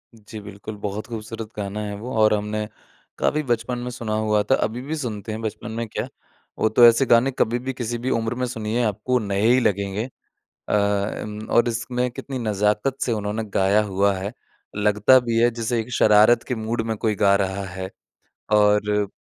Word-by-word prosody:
जी, 110 0 -10
बिल्कुल, 100 +1 -9
बहुत 105 +1 -4
खूबसूरत 115 -1 -6
गाना 100 +1 -4
है 100 - -5
वो 115 +5 -7
और 110 0 +5
हमने 105 0 -2 0.5
काफ़ी 155 - +1
बचपन 120 0 -1
में 125 0 -4
सुना 115 -3 -4
हुआ 105 -1 +2
था। - - +7
अभी 120 +3 -3
भी 150 +4 -4
सुनते 110 -6 -5
हैं 110 - -5
बचपन 110 +1 -5
में 115 0 -3
क्या, - - -4 0.5
वो 110 - +3
तो 120 +2 +6
ऐसे 115 +3 +4
गाने 120 +3 +4
कभी 120 -1 0
भी 130 - -1
किसी 120 -1 -3
भी 130 - +1
उम्र 115 +1 -1
में 125 +1 -1
सुनिए, 115 0 -2
आपको 115 +4 0
नए 100 -3 -2
ही 125 +2 +5
लगेंगे। 100 0 0 0.6
अ - - 0
अम, 105 +1 -1
और 120 0 +4
इसमें 125 +2 -2
कितनी 130 +2 -6
नज़ाकत 105 +3 0
से 120 - 0
उन्होंने 105 +1 -2
गाया 100 +2 +3
हुआ 100 0 +1
है, 100 +4 -4 0.4
लगता 105 +5 +5
भी 115 -1 -1
है 120 - +5
जैसे 115 0 -2
एक 115 +3 -7
शरारत 110 +3 +5
के 125 - 0
मूड 115 +1 -2
में 110 -1 -2
कोई 110 0 0
गा 100 -1 +4
रहा 95 0 -2
है। 95 0 -6 0.6
और 105 -1 +3
110 Hz, 195 wpm, -23 LUFS, 105-120 Hz, 0.6 s, था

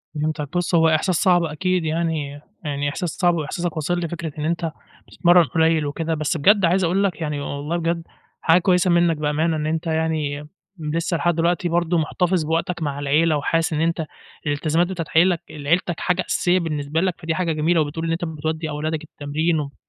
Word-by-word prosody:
فهمتك، 150 +1 -2
بُص، 175 0 0
هو 165 -1 +5
إحساس 160 +4 +2
صعب 175 0 +3
أكيد 180 +3 -1
يعني 155 -3 -2 0.2
يعني 145 -1 -1
إحساس 170 +4 -3
صعب، 175 +2 +1
وإحساسك 165 +2 -3
واصل 175 +3 -1
لي، 170 - -2
فكرة 170 -1 -5
إن 150 - -2
أنتَ 165 0 -1 0.4
بتتمرن 175 0 +4
قليل 160 -1 +2
وكده. 160 +3 -2
بس 155 +1 -1
بجد 200 +5 +5
عايز 180 +3 +2
أقول 180 +4 +2
لك 180 -5 -1
يعني، 150 -2 -2
والله 145 +4 -3
بجد، 170 0 -1 0.4
حاجة 165 +2 +5
كويسة 180 0 +3
منّك 170 -2 +3
بأمانة، 155 +2 0
إن 150 - -2
أنتَ 160 +2 -2
يعني 155 -2 -1 0.5
لسه 170 +1 0
لحد 175 0 +1
دلوقتي 170 +1 +1
برضه 170 0 +1
محتفظ 175 +2 +1
بوقتك 165 +2 -1
مع 145 -2 -2
العيلة، 150 +2 +2
وحاسس 165 +3 0
إن 155 - 0
أنتَ 165 -1 0 0.4
الإلتزامات 155 +4 +1
بتاعة 175 -4 -4
عيل 175 +1 +5 0.3
عيلتك 175 +1 +1
حاجة 180 0 +1
أساسية 180 +1 +2
بالنسبة 155 -2 -2
لك، 185 -2 0
فدي 160 0 -1
حاجة 170 -1 0
جميلة. 160 +2 +2
وبتقول 155 +3 -3
إن 165 - -1
أنتَ 165 +1 -1
بتودّي 160 0 -3
أولادك 155 +1 -3
التمرين، 155 +2 -1
وبت 140 -1 -5
165 Hz, 190 wpm, -22 LUFS, 155-175 Hz, 0.5 s, هو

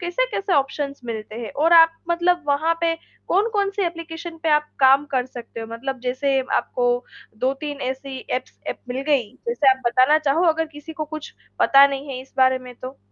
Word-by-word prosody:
कैसे-कैसे 390 +2 -1
ऑप्शंस 280 0 -1
मिलते 220 -2 -6
हैं, 230 -2 -6
और 325 +4 +2
आप 330 -1 +8 0.2
मतलब 350 +1 +2
वहाँ 310 +4 +2
पे 330 -1 +2 0.3
कौन-कौन-सी 405 0 +1
एप्लीकेशन 335 0 -7
पे 325 - 0
आप 300 0 +3
काम 270 +2 +6
कर 255 -1 +1
सकते 240 -2 -9
हो 225 - -6
मतलब 250 +3 -5
जैसे 265 +2 0 0.2
आपको 245 -1 -1 0.5
2-3 275 +3 -2
ऐसी 265 +1 -4
एप्स 255 0 -4
एप्प - - -4
मिल 255 +2 -3
गयी 270 -8 +2 0.2
जैसे 300 - +4
आप 260 0 0
बताना 255 +6 +4
चाहो 305 +3 +1
अगर 320 0 +1
किसी 295 +2 -9
को 310 -1 -4
कुछ 310 -1 -7 0.3
पता 275 0 +7
नहीं 275 +1 -5
है 260 -2 -5
इस 265 - -21
बारे 260 0 +4
में 250 -1 -11
तो? 255 +3 -9
280 Hz, 190 wpm, -22 LUFS, 260-330 Hz, 0.5 s, आप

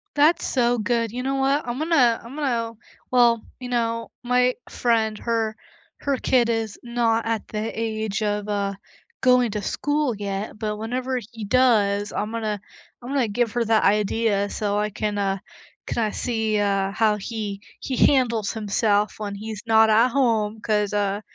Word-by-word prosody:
That's 310 +4 +4
so 245 -2 +2
good. 230 0 0
You 250 +2 -4
know 270 +1 -1
what? 270 0 +1
I'm 240 +2 -3
gonna 280 -8 +3
I'm 235 +4 -10
gonna 235 -6 -1 0.4
well, 240 -2 +4 0.2
you 250 - -6
know, 230 -1 -1
my 250 +1 +3 0.2
friend, 220 -3 +1
her 225 -2 -1 0.5
her 280 -2 0
kid 245 -2 +2
is 225 -2 -1
not 235 -1 +1
at 225 -2 -2
the 215 +1 -3
age 220 -2 -2
of, 210 -1 -1
uh, 200 -1 -1 0.5
going 250 -2 +4
to 210 0 -3
school 290 +3 0
yet, 200 +1 -4
but 210 -1 -2
whenever 250 +4 -2
he 225 -2 -7
does, 205 -4 +3
I'm 210 +1 -2
gonna 215 -3 -3 0.4
I'm 245 - -8
gonna 270 -4 +1
give 225 +1 0
her 240 -1 0
that 220 -1 +3
idea, 205 0 +2
so 205 -1 -1
I 210 0 0
can, 210 +1 -2
uh, 195 -1 0 0.5
can, - - -3
uh, 210 - -2
see, 220 -3 -1
uh, 195 -1 +1
how 215 +1 +2
he 210 -1 -5 0.2
he 265 - -3
handles 235 -6 +3
himself 210 -1 +1
when 205 -2 -4
he's 215 0 -7
not 220 -1 +5
at 225 +3 +5
home, 225 -5 +1
'cause, 210 -2 0
uh, 205 0 0
225 Hz, 170 wpm, -23 LUFS, 210-245 Hz, 0.5 s, not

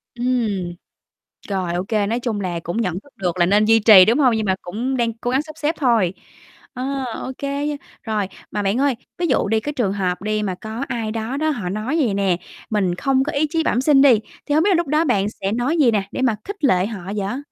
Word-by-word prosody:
Ừm. 225 -8 -1 0.8
Rồi, 185 -3 -1
ô 175 - -1
kê, 210 -2 +1
nói 230 +3 -1
chung 225 -4 -2
là, 175 -2 -2
cũng 175 +6 -4
nhận 180 -5 -1
thức 285 - -21
được 180 -2 -2
là 175 - +4
nên 205 +3 +3
duy 225 +1 +5
trì, 205 -4 +8
đúng 235 +6 +2
hông? 255 -5 +4
Nhưng 220 -1 -1
mà 190 -1 +2
cũng 240 +9 -3
đang 235 -2 0
cố 245 +2 -4
gắng 265 +2 +2
sắp 310 0 -12
xếp 315 +1 -1
thôi. 225 - +2 0.6
Ờ, 265 +1 -3 0.2
ô 260 - -4
kê 280 +1 -2
nha, 295 - -2 0.3
rồi. 215 -4 -1 0.2
Mà 210 - -2
bạn 200 +3 0
ơi, 280 -3 +2 0.2
ví 350 -1 0
dụ - - +1
đi 220 +2 +2
cái 295 +5 -4
trường 210 -8 0
hợp 185 -3 -2
đi 215 0 -1
mà 185 -3 -2
có 220 +6 -6
ai 230 -3 -3
đó 225 +4 -3
đó 310 +1 +1
họ 215 -12 -2
nói 215 - -2
vầy 225 -7 +1
nè: 195 -3 +1 0.3
"Mình 190 -5 0
không 265 +5 +1
có 305 - -3
ý 295 +2 +1
chí 325 0 0
bẩm 250 - +1
sinh" 275 -1 +5
đi. 255 -6 +6 0.3
Thì 295 - 0
hông 315 - +4
biết - - +3
là 380 - +4
lúc 345 -3 0
đó 305 +3 +2
bạn 205 -6 +1
sẽ 195 -1 -4
nói 250 +8 0
gì 260 -6 +5
nè 205 -2 +1
để - - -4
mà 240 -5 +2
khích 405 -4 -7
lệ 185 -8 +3
họ 210 -5 -6
vậy? 205 +5 -2
225 Hz, 255 wpm, -21 LUFS, 200-275 Hz, 0.8 s, trì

